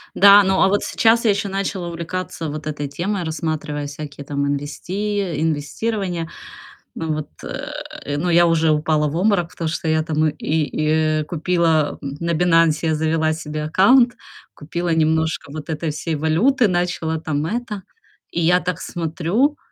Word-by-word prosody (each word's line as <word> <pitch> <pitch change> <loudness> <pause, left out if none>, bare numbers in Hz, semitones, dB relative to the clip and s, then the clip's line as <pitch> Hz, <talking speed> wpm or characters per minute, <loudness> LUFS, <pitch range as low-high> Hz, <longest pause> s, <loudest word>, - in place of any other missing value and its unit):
Да, 200 +1 +8
ну, 190 0 +2
а - - +6
вот 205 +1 +1
сейчас 230 +1 +3
я 215 - +5
ещё 200 0 -1
начала 195 -2 -3
увлекаться 170 -1 -4
вот 155 +1 -6
этой 145 -1 -3
темой, 180 +6 -2
рассматривая 155 -2 -3
всякие 145 -1 -8
там 140 0 -1
инвести 175 +9 -3
э, 170 -7 -2
инвестирования. 165 +3 -2 0.7
Вот, 155 -2 -3 0.2
э, 145 +1 -6
но 175 +4 -1
я 175 +1 +6
уже 165 -1 +3
упала 150 0 +1
в 150 - -4
обморок, 180 -2 +2
потому 165 - -4
что 160 +1 -3
я 155 0 +2
там 155 0 +1
и - - -6 0.9
и - - -2
купила, 165 -2 +1
м, 140 -1 -6
на 170 0 -1
"Бинансе", 165 -1 +3
завела 160 0 +1
себе 155 -1 -5
аккаунт, 240 +10 +5 0.4
купила 170 +4 -4
немножко 160 -1 +1
вот 155 +1 -7
этой 160 0 -2
всей 155 +2 -3
валюты, 200 - +3
начала 175 -3 -1
там 155 -1 -2
это, 210 0 -4 0.5
и 170 - -1
я 175 +2 +4
так 180 -2 -3
смотрю, 175 - 0
165 Hz, 160 wpm, -21 LUFS, 155-185 Hz, 0.9 s, Да